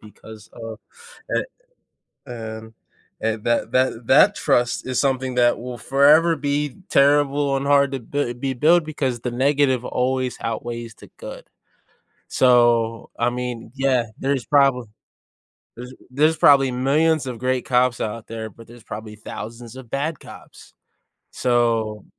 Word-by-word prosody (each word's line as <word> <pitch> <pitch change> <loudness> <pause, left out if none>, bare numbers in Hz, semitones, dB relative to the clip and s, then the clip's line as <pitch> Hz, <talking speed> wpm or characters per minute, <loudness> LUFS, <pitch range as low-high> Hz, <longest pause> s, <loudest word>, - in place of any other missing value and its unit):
because 110 0 -14
of 115 -1 -8 0.6
eh, - - 0 0.8
and 110 -2 -8 0.5
and 110 -1 -2
that 120 0 0
that 130 -3 0
that - - +5
trust 120 0 0
is 130 -1 -1
something 130 -2 0
that 120 -1 +3
will 125 0 -7
forever 145 +7 +4
be 145 -1 -2
terrible, 140 0 +3
and 135 - -4
hard 140 -1 +3
to 135 - -2
b 125 +1 -3
be 130 +2 -3
built 160 +7 +4
because 135 -6 -3
the 125 - -3
negative 130 0 +1
always 130 0 -1
outweighs 115 0 -5
the - - -16
good. - - -9 0.8
So, 120 -2 +3
I 120 +1 +2
mean, 125 -2 -5
yeah, 130 -3 +1
there's 135 -2 -1
probably 135 -4 +3 0.9
there's 125 +1 -9 0.2
there's 155 +5 +2
probably 135 -3 +5
millions 145 +4 +1
of 125 -3 -5
great 130 0 -1
cops 125 -1 +2
out 110 +1 -4
there, 110 -1 -6
but 115 +3 -16
there's 120 0 -15
probably 105 0 -8
thousands 115 +3 -9
of 130 -3 -12
bad 150 +2 -2
cops, - - -14 0.6
so 115 -4 0
125 Hz, 140 wpm, -22 LUFS, 115-140 Hz, 0.9 s, that